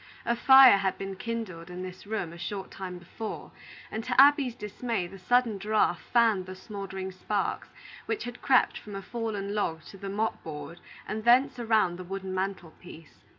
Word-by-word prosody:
A 235 - +1
fire 265 -3 +8
had 190 -1 -1
been 195 0 -5
kindled 190 -6 -5
in 180 +1 -6
this 185 +2 -9
room 205 -6 -3
a - - -10
short 195 +3 -5
time 185 -2 -6
before, 180 +5 -7 0.4
and, 220 - -3
to - - +1
Abby's 275 -3 +6
dismay, 220 -2 -3
the 190 +2 -11
sudden 235 0 +2
draught 210 -3 +1
fanned 225 -6 +3
the 185 - -7
smouldering 190 -1 -6
sparks 195 +2 -2 0.4
which 435 - -2
had 245 0 -8
crept 260 -2 +3
from 205 -2 -9
a 195 - -6
fallen 210 -2 -4
log 165 -7 -1
to 195 - -12
the 195 - -5
mop 215 +3 -1
board 155 +2 -8 0.3
and 215 0 -4
thence 245 +2 +4
around 220 -7 +2
the - - -5
wooden 190 +1 -5
mantel 190 -3 -3
piece. 165 -3 -14
200 Hz, 185 wpm, -28 LUFS, 185-230 Hz, 0.4 s, fire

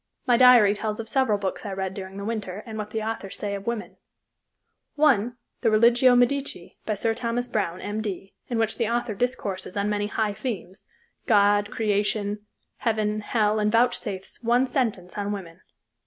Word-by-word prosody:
My 245 - +4
diary 240 -5 +7
tells 215 +1 -3
of 225 - -5
several 225 -2 +2
books 195 -2 -4
I 205 - -5
read 190 0 -3
during 190 0 -8
the 200 - -5
winter 210 -3 -4
and 220 - -7
what 210 -1 -4
the 220 0 -3
authors 220 -3 -4
say 205 -1 -3
of 200 +1 -6
women; 235 -2 -4 1.0
one 245 -6 +3 0.2
the 230 - +3
"Religio 235 +3 +5
Medici," 245 -7 0
by 215 - 0
Sir 225 +3 0
Thomas 240 +1 -2
Browne, 185 -6 -2
M.D., 205 -2 -4
in 240 - -2
which 225 +1 0
the 230 -2 +1
author 240 -1 -1
discourses 200 -5 -3
on 200 +1 0
many 205 0 0
high 215 0 -1
themes, 205 -4 -6 0.4
God, 205 -2 +4
Creation, 205 -1 0 0.4
Heaven, 215 -2 0
Hell, 215 -1 +1
and 210 0 +1
vouchsafes 225 -4 0
one 240 +2 +3
sentence 220 -8 -2
on 205 0 -2
woman. 185 -3 -7
215 Hz, 170 wpm, -25 LUFS, 200-235 Hz, 1.0 s, diary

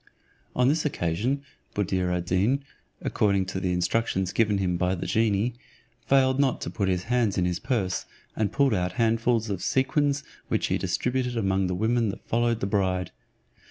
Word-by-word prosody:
On 125 0 +3
this 150 +3 +2
occasion, 125 - -1 0.3
Buddir 95 -3 0
ad 90 -1 -1
Deen, 105 +11 +1 0.4
according 100 -2 +1
to 95 0 -4
the 90 -1 -1
instructions 95 +1 0
given 105 -3 +2
him 90 -2 0
by 90 +2 +1
the 90 - -5
genie, 110 +1 +1 0.5
failed 130 -1 +4
not 135 -3 +2
to - - -4
put 100 -4 -1
his 90 -1 0
hands 120 -3 +1
in 90 - +2
his 90 0 -1
purse, 100 -5 -1 0.3
and 110 -2 0
pulled 140 -4 +3
out 90 -2 0
handfuls 115 0 +1
of 95 -3 -3
sequins, 140 +1 +1 0.2
which - - 0
he - - +1
distributed 125 +6 -1
among 95 -3 +1
the 90 - -1
women 115 +3 +1
that 100 - -7
followed 120 0 +1
the - - +1
bride. 95 -3 0
105 Hz, 175 wpm, -26 LUFS, 95-125 Hz, 0.5 s, failed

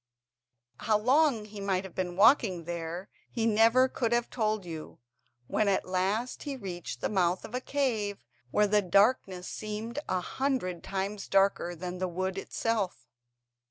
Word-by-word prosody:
How 215 -1 +2
long 255 0 +3
he 210 -1 -9
might 190 -1 0
have 190 -3 -9
been 180 -2 -3
walking 200 - +4
there 170 +2 -5 0.2
he 225 -2 -1
never 230 +4 +5
could 235 -3 -2
have 240 0 0
told 215 -4 0
you, 160 -2 -8 0.5
when 215 - +1
at 195 -1 +2
last 195 +7 -1
he 280 -2 -4
reached 175 - -6
the - - +1
mouth 185 -3 +1
of 225 - -11
a 250 - -1
cave 220 - -1 0.2
where 210 +10 +3
the 210 0 +3
darkness 195 -1 +2
seemed 215 +4 -5
a 185 - +1
hundred 240 -5 -2
times 195 +1 -3
darker 195 -3 +2
than 180 +2 -6
the 185 - 0
wood 185 +2 -2
itself. 215 -2 -2
200 Hz, 160 wpm, -29 LUFS, 185-225 Hz, 0.5 s, never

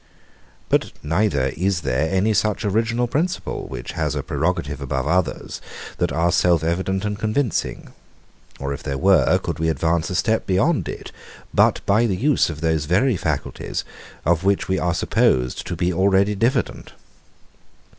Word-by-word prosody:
But - - +1
neither 80 -4 +1
is 90 +2 0
there 70 +2 0
any 95 +5 +2
such 105 +2 0
original 115 +4 +1
principle, 160 +9 -2
which - - -6
has - - -2
a - - -2
prerogative 75 -5 -2
above 65 -1 -2
others, 90 +2 -1 0.4
that - - +1
are 85 +4 +1
self 85 -2 +3
evident 95 +4 -1
and 105 0 -3
convincing: 110 +3 -1 0.7
or 70 +1 -3
if 70 - -7
there 70 -2 -3
were, - - +4
could - - -4
we 80 0 +1
advance 80 +1 0
a 90 - -3
step 110 +4 +1
beyond 95 -1 +1
it, - - -7 0.4
but - - +3
by 110 +4 +3
the 95 -4 -1
use 140 - +2
of 75 -2 -6
those 80 -2 +1
very 100 - +2
faculties, - - -3 0.4
of 85 +2 +2
which 100 0 +1
we 95 0 0
are 85 -1 0
supposed 65 -4 +1
to 90 - -3
be 90 +2 0
already 95 +3 +3
diffident. 115 +4 -1
90 Hz, 160 wpm, -22 LUFS, 80-105 Hz, 0.7 s, were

